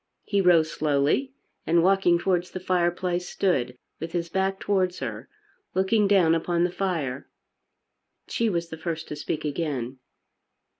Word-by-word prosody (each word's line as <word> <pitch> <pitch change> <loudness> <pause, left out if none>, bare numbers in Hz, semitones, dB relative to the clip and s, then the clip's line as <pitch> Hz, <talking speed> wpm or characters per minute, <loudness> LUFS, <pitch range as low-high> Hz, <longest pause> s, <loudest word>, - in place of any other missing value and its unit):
He 200 -1 +1
rose 165 -4 +4
slowly 155 - +1 0.3
and 170 +1 +4
walking 190 -2 +4
towards 175 0 0
the 185 - -6
fireplace 180 0 0
stood 125 -10 0 0.2
with 165 +1 -6
his 170 -1 -2
back 190 +2 0
towards 185 -3 0
her, - - -6 0.5
looking 200 +2 +3
down 185 -5 +4
upon 170 +1 +1
the 175 - +1
fire. 160 -9 -2 1.0
She 230 -1 0
was 170 -3 -2
the 160 - -7
first 165 -1 -4
to - - -4
speak 155 +1 -4
again. 140 -5 -3
175 Hz, 145 wpm, -26 LUFS, 160-190 Hz, 1.0 s, rose